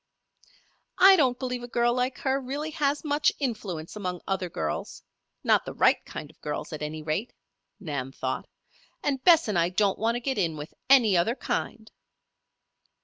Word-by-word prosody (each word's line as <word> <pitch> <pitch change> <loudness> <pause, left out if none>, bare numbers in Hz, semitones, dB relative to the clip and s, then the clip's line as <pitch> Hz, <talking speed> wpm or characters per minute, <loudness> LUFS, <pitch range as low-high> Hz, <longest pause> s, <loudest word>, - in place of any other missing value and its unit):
"I 385 +1 +8
don't 260 -8 +2
believe 250 -1 -3
a 240 - -7
girl 240 0 +2
like 250 +1 -1
her 270 0 0
really 285 +4 -4
has 290 -1 0
much 295 0 +2
influence 210 - -4
among 180 -4 -4
other 190 -2 -1
girls 80 - -4 0.4
not - - +4
the - - -7
right - - +3
kind 150 -1 -8
of - - -33
girls, 150 +1 -4
at 155 - -6
any 155 +1 -5
rate," 160 +10 -2 0.5
Nan 140 -8 -4
thought. 130 -1 -4 0.6
"And 270 -2 -1
Bess 330 -5 +6
and 200 -5 +1
I 170 +1 +2
don't 195 +1 +1
want 230 +2 +1
to - - -1
get 260 -2 -2
in 165 -4 0
with 150 +2 -8 0.2
any 240 -8 +6
other 200 +8 +2
kind." 220 -4 -4
220 Hz, 175 wpm, -27 LUFS, 165-265 Hz, 0.6 s, I